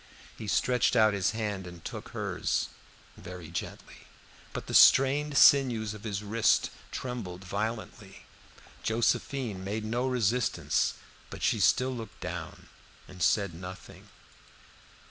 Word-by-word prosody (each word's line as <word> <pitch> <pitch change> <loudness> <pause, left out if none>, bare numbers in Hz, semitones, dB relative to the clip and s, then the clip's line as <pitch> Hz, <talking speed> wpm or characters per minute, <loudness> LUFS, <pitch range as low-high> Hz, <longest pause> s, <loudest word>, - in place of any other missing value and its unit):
He 110 - -8
stretched 125 +4 +2
out 110 -2 +5
his 95 -2 +1
hand 105 -4 -3
and 85 -1 -12
took - - -7
hers, - - -2 0.5
very 90 -3 -9
gently, 85 - -7 0.4
but - - -6
the - - -7
strained 140 +2 +6
sinews 120 -6 +5
of 105 0 -11
his 100 -1 -3
wrist 110 +1 +2 0.2
trembled 105 -8 -5
violently. 105 +1 -5 0.6
Josephine 115 -2 -1
made 105 +3 -3
no 120 +4 -1
resistance, 125 -1 +1 0.3
but - - -8
she - - +2
still 130 +1 +3
looked 110 -3 -9
down - - -7 0.4
and 90 0 -12
said 100 -2 +2
nothing. 90 +2 -10
110 Hz, 125 wpm, -29 LUFS, 95-125 Hz, 0.6 s, strained